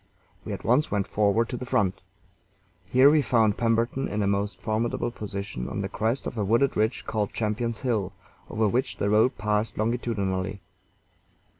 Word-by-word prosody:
We -, -, -6 dB
at -, -, -5 dB
once 130 Hz, +6 st, +3 dB
went 100 Hz, -2 st, 0 dB
forward 105 Hz, +2 st, +2 dB
to 125 Hz, -, -3 dB
the 125 Hz, -, -6 dB
front. 105 Hz, -8 st, +1 dB, 0.9 s
Here 130 Hz, +2 st, +6 dB
we 155 Hz, -1 st, +4 dB
found 110 Hz, -6 st, +3 dB
Pemberton 115 Hz, +3 st, +1 dB
in 105 Hz, 0 st, -1 dB
a -, -, +1 dB
most 100 Hz, -1 st, -1 dB
formidable 115 Hz, +2 st, -1 dB
position 100 Hz, -, -5 dB
on -, -, -3 dB
the -, -, -3 dB
crest 115 Hz, +5 st, -1 dB
of 115 Hz, -, -4 dB
a -, -, +1 dB
wooded 115 Hz, +7 st, +2 dB
ridge 110 Hz, +3 st, 0 dB
called 105 Hz, -2 st, -2 dB
Champion's 110 Hz, +1 st, -2 dB
Hill, 110 Hz, -7 st, 0 dB, 0.4 s
over 110 Hz, 0 st, +1 dB
which 125 Hz, +6 st, -1 dB
the 100 Hz, -, 0 dB
road 110 Hz, +5 st, +3 dB
passed 105 Hz, +1 st, -1 dB
longitudinally. 100 Hz, -4 st, -1 dB
110 Hz, 170 wpm, -26 LUFS, 100-120 Hz, 0.9 s, Here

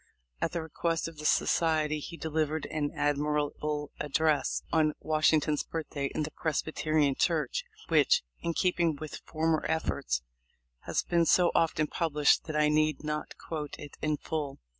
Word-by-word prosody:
At -, -, 0 dB
the 170 Hz, -2 st, -2 dB
request 165 Hz, +1 st, -1 dB
of 165 Hz, -2 st, -10 dB
the 150 Hz, -, -6 dB
society 155 Hz, -2 st, +2 dB
he 170 Hz, +3 st, -7 dB
delivered 155 Hz, -1 st, -1 dB
an 150 Hz, -2 st, -1 dB
admirable 150 Hz, 0 st, -1 dB
address, 150 Hz, 0 st, +1 dB
on 155 Hz, -2 st, +3 dB
Washington's 155 Hz, -1 st, +2 dB
birthday, 150 Hz, -3 st, -3 dB
in 155 Hz, -, 0 dB
the 150 Hz, -, -4 dB
Presbyterian 155 Hz, -2 st, 0 dB
Church, 165 Hz, -, 0 dB, 0.2 s
which, 480 Hz, +1 st, +4 dB, 0.2 s
in 170 Hz, -1 st, -2 dB
keeping 175 Hz, -3 st, +2 dB
with 155 Hz, +1 st, -7 dB
former 160 Hz, 0 st, +1 dB
efforts, 140 Hz, -, -1 dB, 0.6 s
has -, -, +1 dB
been 170 Hz, -1 st, +2 dB
so 175 Hz, -1 st, +5 dB
often 155 Hz, -2 st, +2 dB
published 150 Hz, -3 st, +2 dB
that 155 Hz, -, -5 dB
I 150 Hz, 0 st, +4 dB
need 155 Hz, -1 st, +2 dB
not 150 Hz, 0 st, -4 dB
quote 150 Hz, -3 st, -5 dB
it 145 Hz, -, -10 dB
in 155 Hz, -1 st, 0 dB
full. 145 Hz, -2 st, -4 dB
155 Hz, 150 wpm, -30 LUFS, 150-160 Hz, 0.6 s, so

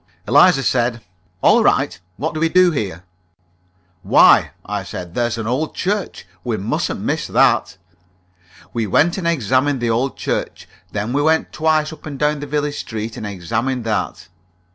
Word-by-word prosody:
Eliza 145 Hz, -, +5 dB
said: 120 Hz, -3 st, 0 dB, 0.4 s
"All -, -, +5 dB
right. -, -, +1 dB, 0.2 s
What 160 Hz, +3 st, -2 dB
do 155 Hz, -, -4 dB
we 165 Hz, +1 st, +2 dB
do 185 Hz, +1 st, +5 dB
here?" 95 Hz, -, -4 dB, 1.0 s
"Why," -, -, +5 dB, 0.2 s
I 105 Hz, 0 st, -3 dB
said, 90 Hz, -2 st, -8 dB
"there's 120 Hz, +1 st, 0 dB
the 115 Hz, -, -4 dB
old 130 Hz, +7 st, -2 dB
church. 200 Hz, -, -2 dB, 0.2 s
We 115 Hz, -3 st, -2 dB
mustn't 100 Hz, +3 st, -2 dB
miss -, -, -2 dB
that." -, -, +2 dB, 1.0 s
We 115 Hz, -2 st, -1 dB
went 170 Hz, -, +2 dB
and 170 Hz, -, -2 dB
examined 135 Hz, -2 st, +1 dB
the 120 Hz, -1 st, 0 dB
old 125 Hz, +4 st, -1 dB
church. -, -, -3 dB, 0.2 s
Then 105 Hz, +3 st, -3 dB
we 145 Hz, -, +1 dB
went 160 Hz, +2 st, +1 dB
twice 155 Hz, 0 st, +1 dB
up 155 Hz, -, -12 dB
and 145 Hz, -2 st, -6 dB
down 150 Hz, +1 st, +1 dB
the 145 Hz, -, -6 dB
village 145 Hz, 0 st, -2 dB
street, 110 Hz, 0 st, -5 dB
and 105 Hz, -, -5 dB
examined 115 Hz, +7 st, -2 dB
that. 110 Hz, -6 st, -3 dB
130 Hz, 165 wpm, -19 LUFS, 110-155 Hz, 1.0 s, Eliza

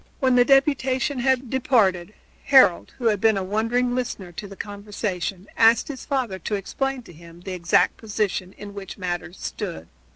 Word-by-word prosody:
When 260 Hz, -2 st, +3 dB
the 245 Hz, -, +6 dB
deputation 270 Hz, 0 st, +2 dB
had 260 Hz, -1 st, +1 dB
departed 215 Hz, -9 st, +1 dB, 0.3 s
Harold, 260 Hz, -11 st, +5 dB
who 245 Hz, -, -6 dB
had 210 Hz, -4 st, +2 dB
been 220 Hz, -2 st, +4 dB
a 195 Hz, -, -1 dB
wondering 230 Hz, +5 st, 0 dB
listener 240 Hz, -7 st, -4 dB
to 200 Hz, +4 st, -7 dB
the 195 Hz, -, -11 dB
conversation, 200 Hz, -2 st, -4 dB
asked 225 Hz, +3 st, +4 dB
his 275 Hz, -3 st, -7 dB
father 250 Hz, -9 st, -1 dB
to 205 Hz, -, -3 dB
explain 265 Hz, +6 st, -3 dB
to 175 Hz, -, -14 dB
him 170 Hz, +1 st, -15 dB
the 190 Hz, -, -7 dB
exact 170 Hz, -2 st, +2 dB
position 205 Hz, -3 st, -2 dB
in 205 Hz, -1 st, -9 dB
which 200 Hz, -1 st, -8 dB
matters 175 Hz, -1 st, -5 dB
stood. 80 Hz, +1 st, -5 dB
210 Hz, 170 wpm, -23 LUFS, 190-255 Hz, 0.3 s, the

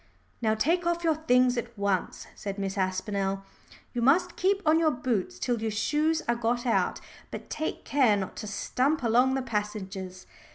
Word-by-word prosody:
"Now 220 Hz, -1 st, +2 dB
take 340 Hz, +10 st, +1 dB
off 345 Hz, 0 st, 0 dB
your 325 Hz, -1 st, +3 dB
things 250 Hz, -5 st, +3 dB
at 235 Hz, -1 st, -8 dB
once," 200 Hz, -2 st, -1 dB
said 200 Hz, -1 st, -6 dB
Miss 195 Hz, -1 st, -3 dB
Aspinall. 195 Hz, +1 st, -1 dB, 0.5 s
"You 240 Hz, -, -2 dB
must 310 Hz, +9 st, +3 dB
keep 395 Hz, +2 st, +1 dB
on 310 Hz, +1 st, +5 dB
your 325 Hz, -1 st, +4 dB
boots 240 Hz, -, -2 dB
till 235 Hz, -, -1 dB
your 220 Hz, -, 0 dB
shoes 305 Hz, +9 st, +1 dB
are 235 Hz, -, +3 dB
got 240 Hz, +1 st, -1 dB
out, 235 Hz, -, +1 dB, 0.3 s
but -, -, -8 dB
take 315 Hz, -, -3 dB
care 255 Hz, -7 st, +3 dB
not 190 Hz, -1 st, -4 dB
to 215 Hz, -, -5 dB
stump 260 Hz, +8 st, 0 dB
along 245 Hz, +3 st, +3 dB
the 265 Hz, -, -1 dB
passages. 200 Hz, -5 st, -4 dB
235 Hz, 175 wpm, -28 LUFS, 200-290 Hz, 0.5 s, on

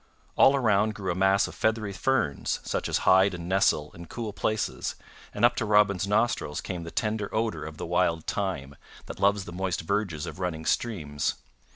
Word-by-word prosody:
All 135 Hz, -, +6 dB
around 110 Hz, -4 st, +2 dB
grew 95 Hz, -3 st, -2 dB
a -, -, -2 dB
mass 95 Hz, +2 st, +3 dB
of -, -, -9 dB
feathery 110 Hz, -2 st, 0 dB
ferns 110 Hz, -, 0 dB
such -, -, -2 dB
as -, -, -1 dB
hide 95 Hz, +1 st, +5 dB
and 85 Hz, -1 st, -7 dB
nestle 90 Hz, -5 st, +2 dB
in 85 Hz, 0 st, -11 dB
cool 110 Hz, 0 st, -5 dB
places, 110 Hz, +1 st, -2 dB, 0.4 s
and -, -, +2 dB
up 120 Hz, 0 st, +4 dB
to -, -, 0 dB
Robin's 105 Hz, -3 st, +3 dB
nostrils 105 Hz, -8 st, 0 dB
came 90 Hz, -2 st, -5 dB
the 85 Hz, -, -7 dB
tender 105 Hz, +1 st, -2 dB
odor 110 Hz, -8 st, -1 dB
of 80 Hz, 0 st, -8 dB
the -, -, -5 dB
wild 85 Hz, -2 st, +1 dB
thyme, 85 Hz, -9 st, -3 dB, 0.3 s
that -, -, -8 dB
loves 100 Hz, -1 st, +2 dB
the 85 Hz, -, -8 dB
moist 95 Hz, 0 st, -2 dB
verges 90 Hz, -3 st, -2 dB
of -, -, -8 dB
running 85 Hz, -4 st, -3 dB
streams. 75 Hz, -12 st, -1 dB
95 Hz, 190 wpm, -27 LUFS, 85-105 Hz, 0.4 s, All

